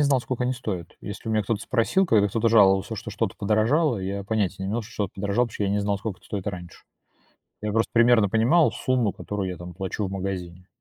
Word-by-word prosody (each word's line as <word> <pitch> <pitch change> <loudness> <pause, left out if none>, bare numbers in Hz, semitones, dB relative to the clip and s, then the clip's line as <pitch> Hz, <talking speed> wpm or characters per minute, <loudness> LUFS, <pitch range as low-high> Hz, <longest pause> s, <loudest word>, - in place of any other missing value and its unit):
знал, 140 -3 +3
сколько 125 0 -3
они 125 +1 +1
стоят. 100 -9 -5
Если 105 +2 -7
у - - 0
меня 110 -1 +1
кто-то 110 0 -1
спросил, 130 +11 +2
когда 110 - +4
кто-то 115 +3 +1
жаловался, 100 -1 +4
что 110 0 -7
что-то 105 -2 -2
подорожало, 115 +7 +2
я 100 +1 -4
понятия 100 -3 -1
не - - -3
имел, 115 +3 -1
что 110 - -13
что-то 100 -4 -3
подорожало, 100 +5 0
потому 105 -3 -3
я - - 0
не 105 - +1
знал, 100 0 0
сколько 105 -2 -5
это - - -21
стоит 100 -3 -5
раньше. 90 -3 -8 0.8
Я 105 0 -2
просто 115 +2 +1
примерно 115 -3 +5
понимал 120 - +4
сумму, 125 -5 0
которую 100 -1 -4
я 90 - -5
там 90 0 -9
плачу 95 +3 -3
в - - -7
магазине, 90 -2 -5
105 Hz, 230 wpm, -25 LUFS, 95-115 Hz, 0.8 s, примерно